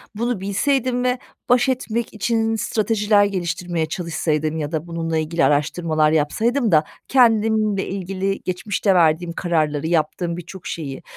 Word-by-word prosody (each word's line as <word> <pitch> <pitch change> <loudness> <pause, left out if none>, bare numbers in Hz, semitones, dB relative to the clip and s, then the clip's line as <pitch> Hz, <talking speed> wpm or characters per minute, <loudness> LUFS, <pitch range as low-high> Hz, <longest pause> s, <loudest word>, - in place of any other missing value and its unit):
bunu 235 -2 -1
bilseydim 250 +5 0
ve 250 0 +1 0.3
baş 245 +2 +4
etmek 235 -3 -2
için 225 0 0
stratejiler 210 -1 +2
geliştirmeye 175 -3 -2
çalışsaydım 160 -2 -2
ya 150 0 -3
da 160 +1 -3
bununla 165 -1 -2
ilgili 155 -1 +1
araştırmalar 155 +2 +1
yapsaydım 220 - +1
da 155 -1 +5 0.2
kendimle 220 -5 +3
ilgili 195 +1 -3
geçmişte 185 +1 0
verdiğim 170 0 +3
kararları, 155 -4 0
yaptığım 170 +1 0
birçok 175 +1 -9
şeyi. 140 -5 -5
180 Hz, 130 wpm, -21 LUFS, 160-220 Hz, 0.3 s, da